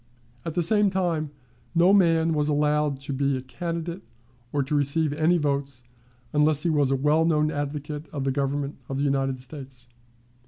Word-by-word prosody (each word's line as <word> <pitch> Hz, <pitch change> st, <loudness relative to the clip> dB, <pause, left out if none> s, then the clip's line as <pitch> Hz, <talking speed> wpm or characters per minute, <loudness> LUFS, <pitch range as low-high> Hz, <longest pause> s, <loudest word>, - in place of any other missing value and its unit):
At 165 Hz, -, -5 dB
the 175 Hz, -, +2 dB
same 205 Hz, +3 st, +3 dB
time, 175 Hz, -5 st, -1 dB, 0.5 s
no 175 Hz, +3 st, +5 dB
man 165 Hz, -4 st, +4 dB
was 150 Hz, -1 st, 0 dB
allowed 150 Hz, -1 st, +1 dB
to 140 Hz, 0 st, -4 dB
be 140 Hz, 0 st, 0 dB
a -, -, -5 dB
candidate 170 Hz, +5 st, -5 dB, 0.5 s
or 145 Hz, -1 st, 0 dB
to 135 Hz, -, -4 dB
receive 145 Hz, +1 st, +2 dB
any 160 Hz, +4 st, +3 dB
votes 140 Hz, -4 st, -2 dB, 0.5 s
unless 150 Hz, 0 st, +3 dB
he 170 Hz, -, +2 dB
was 145 Hz, -3 st, +2 dB
a 135 Hz, -, +2 dB
well 150 Hz, +4 st, +2 dB
known 155 Hz, -2 st, +2 dB
advocate 145 Hz, 0 st, -4 dB
of 140 Hz, -3 st, -3 dB
the 135 Hz, -, 0 dB
Government 140 Hz, +1 st, -2 dB
of 135 Hz, -, -3 dB
the 140 Hz, -, 0 dB
United 135 Hz, -2 st, 0 dB
States. 130 Hz, -2 st, -9 dB
150 Hz, 180 wpm, -25 LUFS, 140-160 Hz, 0.5 s, no